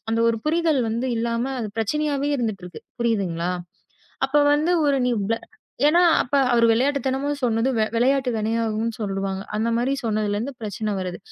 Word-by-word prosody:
அந்த 225 0 +1
ஒரு 230 - -1
புரிதல் 320 -3 +2
வந்து 235 +4 -2
இல்லாம 235 +3 -1
அது 215 -3 -4
பிரச்சனையாவே 285 +4 0
இருந்துட்டு 215 -6 -3
இருக்கு. 175 - -10 0.2
புரியுதுங்களா? 185 -7 0 0.8
அப்போ 295 +2 +3
வந்து 310 +4 +2
ஒரு 280 -1 +2
நீ 245 - +2 0.7
ஏன்னா 325 +4 +4 0.2
அப்ப 250 - -2 0.2
அவரு 235 -1 +4
விளையாட்டுத்தனமா 270 +2 0
சொன்னது 235 0 +1 0.3
விளையாட்டு 260 +2 +2
வினையாகும்னு 225 0 -1
சொல்லுவாங்க. 195 -1 -2
அந்த 220 +2 0
மாதிரி 245 +3 0
சொன்னதிலிருந்து 215 +3 -1
பிரச்சனை 210 0 -3
வருது. 180 -1 -4
230 Hz, 145 wpm, -23 LUFS, 215-270 Hz, 0.8 s, ஏன்னா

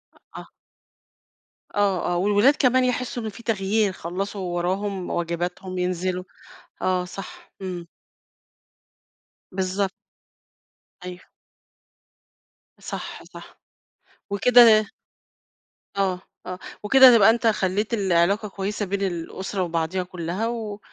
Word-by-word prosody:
أ - - -21 0.2
آه. - - -11 1.3
آه، 195 -3 +1
آه. - - 0
والولاد 205 +9 +4
كمان 255 -1 +3
يحسّوا 250 -1 -2
إن 220 - -3
في 225 +3 -12
تغيير، 210 -1 +1
خلّصوا 190 +3 -5
وراهم، 190 +2 -2
واجباتهم، 175 +2 -3
ينزلوا. 180 0 -1 0.6
آه 185 -1 +1
صح. 185 +2 -10
إمم. 180 -2 -5 1.7
بالضبط. 190 +1 -1 1.1
أيوه. 180 0 -7 1.6
صح، - - -7
صح. - - -13 0.7
وكده 220 0 +6 1.1
آه، 190 -2 0 0.2
آه، 180 0 -6 0.2
وكده 255 +3 +8
تبقى 210 0 +7
أنت 230 +1 +2
خلّيت 205 +1 0
العلاقة 195 0 +2
كويسة 205 +2 -3
بين 200 +1 -3
الأسرة 190 +1 -3
وبعضيها 170 +2 -1
كُلّها 180 +4 -3
و 220 -3 -4
195 Hz, 100 wpm, -24 LUFS, 180-215 Hz, 1.7 s, وكده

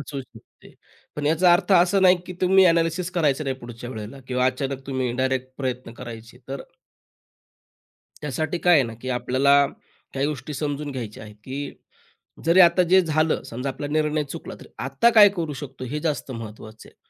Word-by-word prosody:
असू 140 0 -6
शकते. 115 -3 -17 0.4
पण 145 -1 -2
याचा 170 +3 +4
अर्थ 175 +3 +2
असा 180 +2 +4
नाही 185 -1 +6
की - - -6
तुम्ही 190 +1 +5
एनालिसिस 170 +1 +1
करायचं 155 -4 +1
नाही 135 -1 -2
पुढच्या 120 -1 -9
वेळेला 110 +3 -8
किंवा 125 0 +1
अचानक 135 +1 -3
तुम्ही 130 -3 -2
डायरेक्ट 130 0 -1
प्रयत्न 130 -3 -4
करायचे 120 0 -9
तर 135 0 -5 1.6
त्यासाठी 155 +5 -2
काय 175 +1 +4
आहे 140 -4 +5
ना 115 - -6
की 130 - -5
आपल्याला 140 +3 +3 0.5
काही 135 +1 0
गोष्टी 150 0 -5
समजून 145 0 -3
घ्यायच्या 115 -6 -7
आहेत, 105 -1 -12
की 140 +1 -5 0.7
जरी 170 +3 +5
आता 175 +1 +5
जे 185 +2 +5
झालं 155 -1 0
समजा 125 +4 -4
आपला 145 +2 -5
निर्णय 150 0 0
चुकला - - -7
तर - - -12 0.2
आता 135 - +3
काय 205 -2 +9
करू 160 -3 -2
शकतो 135 -2 -8
हे 150 +5 -4
जास्त 150 -3 -2
महत्त्वाचं 110 -2 -9
आहे. - - -29
140 Hz, 175 wpm, -23 LUFS, 130-160 Hz, 1.6 s, काय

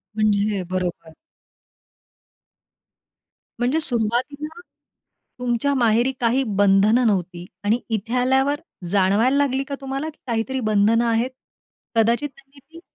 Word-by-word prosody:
म्हणजे 210 -1 +1
अ, - - -3
बरोबर. 180 -3 -3 2.5
म्हणजे 255 +6 +1
सुरुवातीला 285 +6 -2 0.8
तुमच्या 250 +3 0
माहेरी 240 0 +3
काही 245 +3 +2
बंधनं 205 +5 +4
नव्हती 180 -3 -1 0.2
आणि 220 +4 +2
इथे 225 +1 -3
आल्यावर 265 +3 +2 0.3
जाणवायला 205 +7 +3
लागली 275 -1 +1
का 280 0 -5
तुम्हाला 270 +3 -3 0.2
काहीतरी 235 +3 -1
बंधनं 220 +1 +2
आहेत? 230 +2 +1 0.7
कदाचित 235 +6 +2
त्यांनी 275 +1 -20
ती 320 +5 -15
235 Hz, 105 wpm, -22 LUFS, 210-270 Hz, 2.5 s, बंधनं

